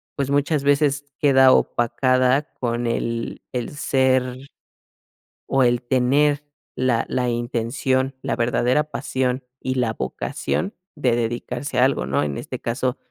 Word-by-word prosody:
pues, 140 -2 -2
muchas 145 +1 +1
veces 145 0 +2 0.2
queda 135 -2 +6
opacada 130 +4 +2
con 120 -1 -1
el 115 0 -2
el 125 -2 -3
ser 130 -3 +1 1.1
o, 135 -1 +3
el 120 0 +2
tener 135 +4 +2 0.3
la 125 -3 +1
la 125 -1 0
intención, 120 +3 -1
la - - -1
verdadera 120 +4 +2
pasión 130 -3 -2 0.2
y 130 0 -2
la 120 -3 0
vocación 190 - -3 0.2
de 130 -6 +1
dedicarse 120 +3 -2
a 125 - +6
algo, 135 - 0
¿no? 70 +1 0
En 70 -1 -3
este - - -6
caso, 125 +2 -2
130 Hz, 135 wpm, -22 LUFS, 120-135 Hz, 1.1 s, queda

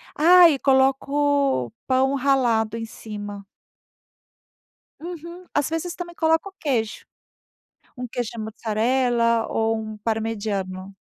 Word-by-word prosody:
Ah, 350 +3 +8
e 280 -4 0
coloco 275 - +2 0.2
pão 265 +1 +2
ralado 245 -5 +1
em 225 - -4
cima. 205 -2 -8 1.6
Uhum. 340 +1 -8
As 290 -1 +1
vezes, 330 +2 -3
também 345 -1 -7
coloco 325 +3 +1
o - - -14
queijo, 235 -7 -2 0.9
um 250 0 -5
queijo 240 -1 -4
mussarela 230 +2 +1
ou 225 0 0
um 215 0 -6
parmegiano. 205 -4 -3
245 Hz, 110 wpm, -23 LUFS, 220-290 Hz, 1.6 s, Ah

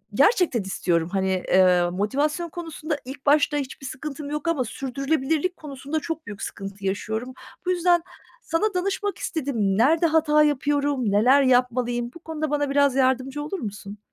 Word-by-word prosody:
gerçekten 345 - +3
istiyorum, 175 -3 -1
hani, 190 -1 0
eee, 180 -2 +4
motivasyon 285 - -1
konusunda 320 -2 -4
ilk 270 +2 -9
başta 295 0 +3
hiçbir 275 -1 -5
sıkıntım 285 +2 -6
yok 300 +2 -4
ama 325 -6 +1
sürdürülebilirlik 275 +7 -1
konusunda 285 +1 -4
çok 325 +1 -5
büyük 205 -2 -8
sıkıntı 195 0 -7
yaşıyorum. 220 +6 -3 0.3
Bu 365 - +1
yüzden 350 -1 +3 0.4
sana 405 +6 0
danışmak 395 +2 -1
istedim. 285 -5 -3 0.2
Nerede 315 +9 +4
hata 305 -1 +4
yapıyorum, 285 -5 +1
neler 250 +7 +5
yapmalıyım, 245 -2 +1
bu - - -10
konuda 315 -2 -4
bana 290 -1 0
biraz 280 -1 +3
yardımcı 265 +2 +1
olur 370 +6 -4
musun? 205 -3 -7
280 Hz, 150 wpm, -24 LUFS, 240-310 Hz, 0.4 s, neler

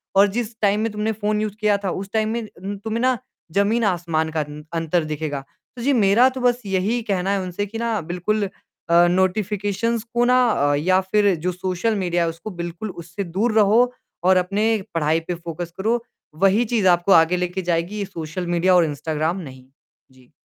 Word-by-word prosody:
और 200 +1 +6
जिस 230 -1 -3
टाइम 205 0 +3
में 225 -1 -1
तुमने 210 +1 -1
फ़ोन 210 0 -1
यूज़ 215 -2 -2
किया 210 -1 +3
था, 190 - 0
उस 195 +1 -5
टाइम 220 0 +1
में 230 0 -2 0.4
तुम्हें 225 +1 -2
ना, 255 -1 +2 0.3
ज़मीन-आसमान 180 -6 +1
का - - +2 0.3
अंतर 165 0 0
दिखेगा। 150 -2 -3 0.4
तो 240 - -8
जी, 280 +3 +2
मेरा 225 +2 +5
तो 260 - -4
बस 245 0 +2
यही 200 +5 0
कहना 195 -3 -1
है 200 - +1
उनसे 185 +3 -3
कि 220 +3 -7
ना 230 -2 -1
बिल्कुल 200 +3 -1 0.4
अ, 170 +1 +6
नोटिफिकेशंस 205 +4 0
को, 240 0 +3
ना 250 +1 +4
अ, 145 -7 +2
या 185 +6 +3
फिर 200 +1 +2
जो 180 - +2
सोशल 185 +4 -1
मीडिया 175 -3 0
है, 165 - 0
उसको 165 +6 -7
बिल्कुल 175 +5 -5
उससे 175 +4 -5
दूर 200 +7 -1
रहो 210 +4 +5 0.4
और 185 0 +5
अपनी 205 +4 +1
पढ़ाई 160 0 +1
पे 180 - -1
फोकस 170 0 -6
करो, 230 +4 0 0.4
वही 205 +5 +4
चीज़ 215 -4 +1
आपको 175 +2 +3
आगे 165 +1 +5
लेके 180 +1 -2
जाएगी, 170 +5 -1
ये 200 - -1
सोशल 170 +1 -6
मीडियाऔर 175 0 +4
इंस्टाग्राम 155 +3 -2
नहीं। 130 -5 -11 0.5
जी। 130 -1 -22
190 Hz, 190 wpm, -22 LUFS, 170-215 Hz, 0.5 s, और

